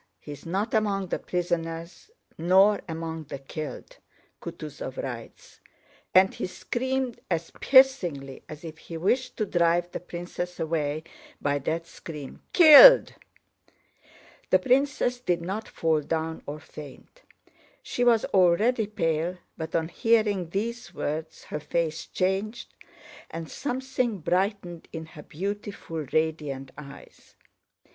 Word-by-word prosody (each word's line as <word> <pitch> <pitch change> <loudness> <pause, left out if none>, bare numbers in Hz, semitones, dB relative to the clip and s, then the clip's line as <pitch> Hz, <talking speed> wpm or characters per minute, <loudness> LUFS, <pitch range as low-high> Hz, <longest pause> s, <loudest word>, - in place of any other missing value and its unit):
He's 145 +1 -10
not 195 +6 -1
among 200 -4 +1
the - - -1
prisoners 170 - -3 0.3
nor 190 +5 +4
among 160 -1 -5
the 140 - -6
killed! 155 - -7 0.4
Kutúzov - - -7
writes..." - - -7 0.5
and 190 +1 +5
he - - -3
screamed 260 +5 -2
as 170 -2 -2
piercingly 180 - +4
as 150 +1 -9
if 160 -1 -8
he 165 - -8
wished 245 +10 0
to 215 - 0
drive 175 -1 +2
the - - -4
princess 175 0 -6
away 155 -2 -1 0.4
by 145 0 0
that 160 +4 -2
scream... 150 -4 -9
"Killed!" 355 +10 +10 1.4
The - - +6
princess 260 -1 +1
did 175 -8 -1
not 195 +5 -4
fall 160 -2 +1
down 160 +2 -3
or 145 +1 -5
faint. 150 - -12 0.6
She 245 - -2
was 235 -2 +4
already 205 +5 +4
pale, 170 -3 -1 0.2
but 160 0 -5
on 160 -1 +1
hearing 210 -4 +2
these 230 +6 -4
words 155 +2 -4
her 150 - -5
face 160 +1 -2
changed 195 +5 -2 0.6
and 165 -1 -7
something 255 -4 -2
brightened 180 0 -1
in 160 -1 -6
her 150 - -9
beautiful, 190 -3 -5
radiant 150 -4 -1
eyes. 145 -1 -13
175 Hz, 120 wpm, -27 LUFS, 160-215 Hz, 1.4 s, Killed